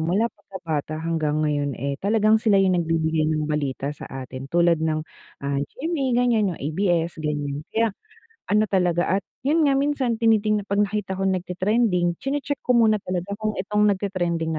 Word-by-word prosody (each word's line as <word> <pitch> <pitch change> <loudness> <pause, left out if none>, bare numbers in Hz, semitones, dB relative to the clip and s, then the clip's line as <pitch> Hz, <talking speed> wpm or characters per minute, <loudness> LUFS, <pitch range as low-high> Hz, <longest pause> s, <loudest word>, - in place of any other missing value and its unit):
mula 200 +8 +1
pagkabata 160 -7 -5
hanggang 155 -2 -1
ngayon, 145 -2 -1
eh, 140 +2 -3
talagang 215 +1 +3
sila 210 -3 +3
yung 185 -2 +3
nagbibigay 160 -1 +1
ng 155 -1 0
balita 145 -2 -2
sa - - -10
atin. 130 0 -7
Tulad 170 -1 +3
ng 155 -1 -1 0.4
ah, 140 0 0
GMA 280 - -3 0.2
ganyan 215 -7 +1
yung - - -13
ABS 165 +1 -1
ganyan. 145 -2 -2
Kaya 225 -2 +1 0.6
ano 210 +1 +3
talaga 180 -3 +1
at 195 - -1 0.2
yun 315 +2 +3
nga 275 -1 +3
minsan 270 -5 0
tinitingna 215 -2 +2
pag 200 +1 +2
nakita 200 -2 -2
ko 195 - -3
nagte-trending 185 0 +1
chine-check 285 +1 -2
ko 250 - +4
muna 220 -2 +4
talaga 185 0 -4
kung 215 0 -1
itong 210 +2 +1
nagte-trending 175 -5 -1
185 Hz, 165 wpm, -23 LUFS, 155-215 Hz, 0.6 s, ko